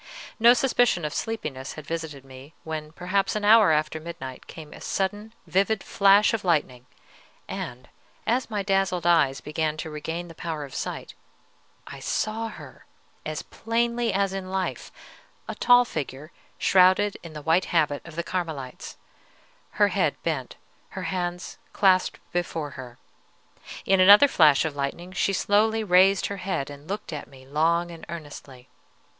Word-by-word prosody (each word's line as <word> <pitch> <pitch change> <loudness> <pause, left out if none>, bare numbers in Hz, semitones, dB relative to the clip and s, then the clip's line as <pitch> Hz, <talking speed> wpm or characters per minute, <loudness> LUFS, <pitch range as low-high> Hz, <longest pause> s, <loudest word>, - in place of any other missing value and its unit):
No 235 +2 +7
suspicion 245 - +2
of 150 - -3
sleepiness 145 -13 -4
had 155 - -10
visited 155 -4 -5
me, 135 +3 -13
when, 155 -1 -5
perhaps 185 +5 -1
an 210 -1 -1
hour 215 -4 +7
after 155 +1 0
midnight, 155 -6 -8
came 155 -2 -11
a - - -12
sudden 205 +3 -2
vivid 195 +2 +1
flash 200 +2 +4
of 225 - -2
lightning, 135 -8 0 0.6
and, 125 +1 -6 0.4
as 245 +3 0
my 210 -2 -2
dazzled 195 -3 0
eyes 160 -6 +3
began 155 +1 -2
to 160 0 -6
regain 160 +3 -5
the 165 - -11
power 160 -2 -5
of 135 - -13
sight, - - -5 0.7
I - - -9
saw 220 +1 -2
her 220 - -12 0.4
as - - -4
plainly 235 0 -1
as 195 0 0
in 190 -1 -5
life, 190 0 -3 0.6
a - - -4
tall 245 0 +5
figure, 150 - -6 0.3
shrouded 190 +2 +4
in 165 -2 -10
the 150 -1 -8
white 165 +4 +2
habit 150 -4 0
of 165 -2 -12
the 170 - -2
Carmelites, 160 -9 -5 0.8
her - - +3
head - - +1
bent, - - -3 0.4
her - - -3
hands 175 -1 -4
clasped 185 -2 +3
before 165 -4 -3
her. 125 -3 -10 0.9
In 195 0 +3
another 205 +9 +8
flash 155 - +4
of 155 -2 -3
lightning 145 +6 -4
she 190 +1 0
slowly 215 +3 +2
raised 190 0 +4
her 200 - -4
head 180 -7 -3
and 145 +1 -12
looked 200 -4 -5
at 150 - -6
me 130 -1 -16
long 165 +5 +1
and 165 -1 -11
earnestly. 145 -6 -9
175 Hz, 155 wpm, -25 LUFS, 150-200 Hz, 0.9 s, another